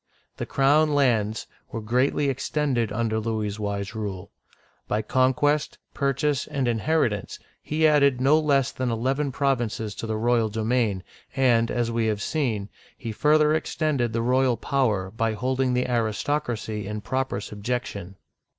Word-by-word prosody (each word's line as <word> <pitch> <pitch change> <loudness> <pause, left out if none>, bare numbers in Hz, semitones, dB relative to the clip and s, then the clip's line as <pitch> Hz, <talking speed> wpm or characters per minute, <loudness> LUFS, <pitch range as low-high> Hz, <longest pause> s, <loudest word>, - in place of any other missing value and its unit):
The - - -4
crown 145 +2 +3
lands 115 -6 +1 0.3
were 115 - -3
greatly 125 +6 +1
extended 135 -4 0
under 110 0 0
Louis's 110 -2 -2
wise 100 0 -3
rule. 100 -5 -5 0.6
By 110 +1 0
conquest, 140 +3 +1 0.2
purchase, 140 +1 0
and 140 -4 -1
inheritance 120 -2 0 0.2
he 155 +1 0
added 140 -4 +4
no 140 +4 +4
less 140 -4 +2
than 130 -1 -2
eleven 135 +5 0
provinces 120 -6 -1
to 115 - -6
the 110 -1 -1
royal 115 0 +2
domain, 110 -3 0 0.3
and, 120 -4 +3
as 120 -1 -1
we 115 -1 0
have 105 -2 -1
seen, 115 -10 -1 0.3
he 115 - -5
further 150 +6 +3
extended 150 -6 0
the 115 0 -1
royal 125 0 +2
power 110 -8 0
by 115 +1 -1
holding 130 +3 0
the 125 - +1
aristocracy 115 -2 -1
in 105 0 -4
proper 130 -2 -2
subjection. 105 -3 -4
120 Hz, 140 wpm, -25 LUFS, 110-140 Hz, 0.6 s, added